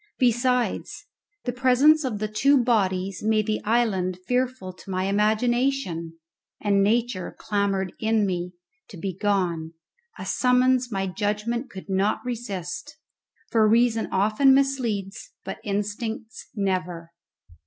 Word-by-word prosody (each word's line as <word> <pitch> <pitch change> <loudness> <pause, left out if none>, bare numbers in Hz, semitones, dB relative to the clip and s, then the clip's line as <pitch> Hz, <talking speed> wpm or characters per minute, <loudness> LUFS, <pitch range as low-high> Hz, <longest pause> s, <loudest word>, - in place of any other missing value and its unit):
Besides, 250 0 0 0.4
the 245 - -1
presence 265 +5 +4
of 250 -6 -2
the 215 +1 -2
two 275 +7 +3
bodies 195 -5 0
made 215 0 +2
the 215 0 -1
island 205 -5 +1
fearful 250 -7 -1
to 185 - -15
my 185 0 -1
imagination, 215 -4 0 0.4
and 200 -1 +2
nature 225 -1 0
clamoured 200 -3 -1
in 220 -1 +2
me 180 -1 -3 0.4
to 195 - -10
be 185 +1 -4
gone, 180 -5 -1 0.4
a - - -7
summons 250 0 +2
my 195 -2 -1
judgment 210 +6 -2
could 190 0 -10
not 195 +5 0
resist, 205 -8 -5 0.5
for 220 -2 +4
reason 230 0 +3
often 215 +8 +4
misleads, 255 - -1
but - - -5
instincts 220 +3 -4
never. 180 -4 -2
215 Hz, 120 wpm, -25 LUFS, 190-245 Hz, 0.5 s, presence